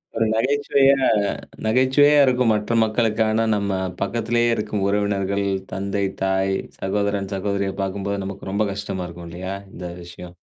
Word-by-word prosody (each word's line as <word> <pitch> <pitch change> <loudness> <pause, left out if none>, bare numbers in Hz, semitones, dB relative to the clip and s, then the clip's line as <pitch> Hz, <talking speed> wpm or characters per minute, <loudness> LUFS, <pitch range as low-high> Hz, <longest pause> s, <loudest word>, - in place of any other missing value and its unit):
ஒரு 115 0 +2
நகைச்சுவையா 135 +1 +3 0.6
நகைச்சுவையா 130 +5 +4
இருக்கும் 125 -3 +3
மற்ற 105 +2 -1
மக்களுக்கு. 110 0 0
ஆனா 110 +1 +2
நம்ம 100 -1 -1 0.3
பக்கத்துலேயே 120 +3 +1
இருக்கும் 105 -1 -2
உறவினர்கள், 100 -1 0 0.3
தந்தை, 100 +1 -1 0.2
தாய், 95 0 +1 0.3
சகோதரன், 100 0 -1
சகோதரிய 100 0 -1
பாக்கும்போது 100 +1 -2
நமக்கு 95 0 -6
ரொம்ப 105 +2 +1
கஷ்டமா 100 -2 -4
இருக்கும் 85 0 -10
இல்லயா? 95 +3 -5 0.2
இந்த 90 0 -6 0.2
விஷயம். 90 0 -11
100 Hz, 130 wpm, -22 LUFS, 95-115 Hz, 0.6 s, நகைச்சுவையா